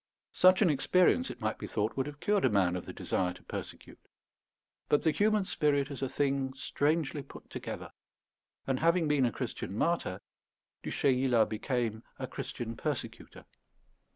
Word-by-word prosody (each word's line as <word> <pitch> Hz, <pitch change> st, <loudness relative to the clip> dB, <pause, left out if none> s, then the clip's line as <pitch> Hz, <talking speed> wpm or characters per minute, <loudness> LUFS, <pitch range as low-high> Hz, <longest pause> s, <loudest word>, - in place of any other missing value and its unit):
Such 185 Hz, +3 st, +6 dB
an 175 Hz, -, +4 dB
experience, 180 Hz, -, +3 dB
it -, -, -8 dB
might 110 Hz, 0 st, -1 dB
be -, -, -5 dB
thought, 105 Hz, +1 st, -1 dB
would 135 Hz, +1 st, -1 dB
have 145 Hz, 0 st, -8 dB
cured 205 Hz, +3 st, +1 dB
a 130 Hz, -, +5 dB
man 95 Hz, -4 st, +2 dB
of 90 Hz, -, -4 dB
the -, -, -5 dB
desire 90 Hz, -1 st, -1 dB
to 90 Hz, -, -15 dB
persecute; -, -, -8 dB, 0.9 s
but 145 Hz, -, +3 dB
the 160 Hz, -, +4 dB
human 205 Hz, +5 st, +2 dB
spirit 145 Hz, -4 st, +1 dB
is 135 Hz, -, -6 dB
a 135 Hz, -, -1 dB
thing 135 Hz, -1 st, 0 dB
strangely 145 Hz, +2 st, 0 dB
put -, -, -13 dB
together; -, -, -6 dB, 0.7 s
and, 135 Hz, -1 st, 0 dB
having 170 Hz, 0 st, +3 dB
been 145 Hz, -4 st, +3 dB
a -, -, -1 dB
Christian 100 Hz, -1 st, -5 dB
martyr, 165 Hz, -, 0 dB, 0.6 s
Du -, -, -5 dB
Chayla 125 Hz, -4 st, +3 dB
became 110 Hz, 0 st, -2 dB, 0.2 s
a -, -, -3 dB
Christian 115 Hz, -1 st, -5 dB
persecutor. 115 Hz, -4 st, -5 dB
135 Hz, 165 wpm, -31 LUFS, 115-155 Hz, 0.9 s, Such